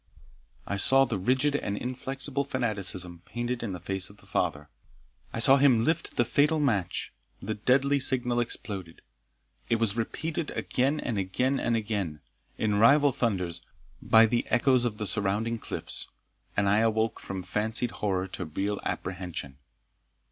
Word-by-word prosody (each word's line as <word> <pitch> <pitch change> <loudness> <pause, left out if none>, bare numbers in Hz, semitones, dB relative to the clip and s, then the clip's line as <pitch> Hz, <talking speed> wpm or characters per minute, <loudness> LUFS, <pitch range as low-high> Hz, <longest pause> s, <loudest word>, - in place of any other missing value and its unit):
I 100 - -3
saw 135 +6 +5
the 115 -6 -3
rigid 130 +8 +2
and 100 -8 -2
inflexible 135 +3 -2
fanaticism 100 -9 -2
painted 120 +3 -4
in 115 -4 -3
the 90 - -5
face 95 +2 -1
of 100 - -16
the - - -18
father 75 +1 -2 0.6
I - - -5
saw 135 +4 +7
him 130 -5 +4
lift 160 +5 -1
the 120 - +2
fatal 145 +7 +2
match 110 - 0 0.3
the 110 - -3
deadly 135 +6 +2
signal 125 -2 +2
exploded 100 -7 -4 0.7
It 115 - +3
was 115 -2 +1
repeated 155 +7 -3
again 135 +4 0
and 115 -5 -2
again 125 +9 0
and 115 - 0
again, 100 -9 -3 0.4
in 105 -2 +1
rival 140 +5 +6
thunders, 95 -10 -2 0.4
by 115 0 +6
the 120 +2 0
echoes 125 0 +3
of 110 -3 -2
the 105 - -3
surrounding 105 +4 0
cliffs, - - -2 0.5
and 100 -1 +2
I 100 +2 +4
awoke 110 0 +1
from 95 -1 -6
fancied 110 +6 -1
horror 95 -3 -1
to 90 - -3
real 100 +6 -2
apprehension. 90 -7 -5
115 Hz, 155 wpm, -28 LUFS, 95-130 Hz, 0.7 s, saw